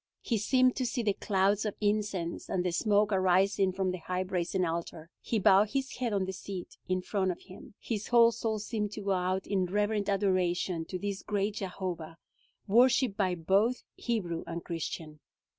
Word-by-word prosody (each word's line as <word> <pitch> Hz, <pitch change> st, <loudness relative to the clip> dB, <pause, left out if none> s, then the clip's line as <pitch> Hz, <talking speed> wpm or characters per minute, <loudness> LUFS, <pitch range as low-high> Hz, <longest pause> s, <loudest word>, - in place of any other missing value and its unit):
He 230 Hz, -3 st, 0 dB
seemed 255 Hz, +4 st, +3 dB
to 260 Hz, -, 0 dB
see 240 Hz, 0 st, -2 dB
the 205 Hz, -2 st, +2 dB
clouds 200 Hz, +1 st, +1 dB
of 210 Hz, -2 st, -3 dB
incense, 205 Hz, -5 st, -1 dB
and 180 Hz, -1 st, 0 dB
the 180 Hz, -, +1 dB
smoke 205 Hz, +3 st, +2 dB
arising 190 Hz, +1 st, +3 dB
from 190 Hz, 0 st, -1 dB
the 180 Hz, -, -5 dB
high 180 Hz, +3 st, -2 dB
brazen 185 Hz, 0 st, -1 dB
altar. 165 Hz, 0 st, -4 dB
He 230 Hz, -, -1 dB
bowed 200 Hz, +1 st, +5 dB
his 270 Hz, 0 st, -2 dB
head 245 Hz, -2 st, -1 dB
on 195 Hz, -2 st, +1 dB
the 190 Hz, -, -4 dB
seat 185 Hz, 0 st, -7 dB
in 185 Hz, 0 st, 0 dB
front 190 Hz, -2 st, 0 dB
of 180 Hz, -, -4 dB
him. 190 Hz, +1 st, -13 dB
His 215 Hz, -3 st, -3 dB
whole 235 Hz, -1 st, +6 dB
soul 225 Hz, -1 st, -2 dB
seemed 210 Hz, -1 st, -3 dB
to 210 Hz, -, -6 dB
go 200 Hz, 0 st, -1 dB
out 185 Hz, 0 st, 0 dB
in 190 Hz, -2 st, 0 dB
reverent 205 Hz, +2 st, 0 dB
adoration 185 Hz, -3 st, +1 dB
to 185 Hz, -, -5 dB
this 200 Hz, 0 st, -4 dB
great 205 Hz, 0 st, -1 dB
Jehovah, 180 Hz, -4 st, -5 dB, 0.5 s
worshiped 240 Hz, +1 st, +4 dB
by 185 Hz, -3 st, +1 dB
both 195 Hz, +9 st, +1 dB
Hebrew 180 Hz, -9 st, -2 dB
and 170 Hz, 0 st, -5 dB
Christian. 160 Hz, -2 st, -5 dB
195 Hz, 185 wpm, -30 LUFS, 180-210 Hz, 0.5 s, whole